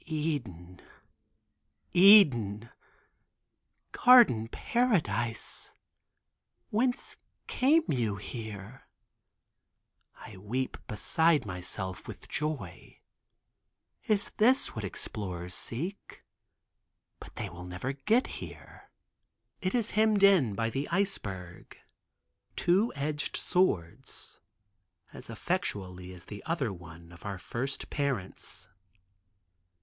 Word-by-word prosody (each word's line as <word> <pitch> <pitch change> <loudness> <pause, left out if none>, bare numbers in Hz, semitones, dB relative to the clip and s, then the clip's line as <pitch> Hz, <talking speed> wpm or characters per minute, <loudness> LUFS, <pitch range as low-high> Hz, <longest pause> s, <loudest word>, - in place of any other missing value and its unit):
"Eden, 120 - -4 1.1
Eden, 130 - +6 1.2
garden 235 - +6
paradise, 120 - -1 1.0
whence 245 +4 0 0.3
came 300 +6 +3
you 115 -6 0
here?" 110 +2 -8 1.3
I 110 -4 -12
weep 120 +7 -3
beside 155 +8 +2
myself 95 0 -6
in - - -5
joy. 150 +1 -5 1.1
Is 210 -4 +1
this 255 +6 +3
what 110 - -4
explorers 90 -1 -6
seek? 170 - -5 1.0
But - - -12
they - - -4
will 85 +2 -9
never 90 +9 -4
get 215 - +2 0.2
here. - - -11 0.7
It 185 +2 -1
is 230 -2 0
hemmed 215 -1 +3
in 170 - +5
by 115 +1 -1
the 135 +4 -2
iceberg, 100 - -3 0.8
two 190 +7 +2
edged 145 +1 -2
swords, 90 - -1 0.7
as - - -10
effectually 90 -2 -3
as 90 -1 -11
the 105 -1 -9
other 140 - -1
one 85 -1 -12
of 85 - -15
our 100 -2 -4
first 125 +8 -5
parents. 135 -10 -3
120 Hz, 90 wpm, -30 LUFS, -, 1.3 s, Eden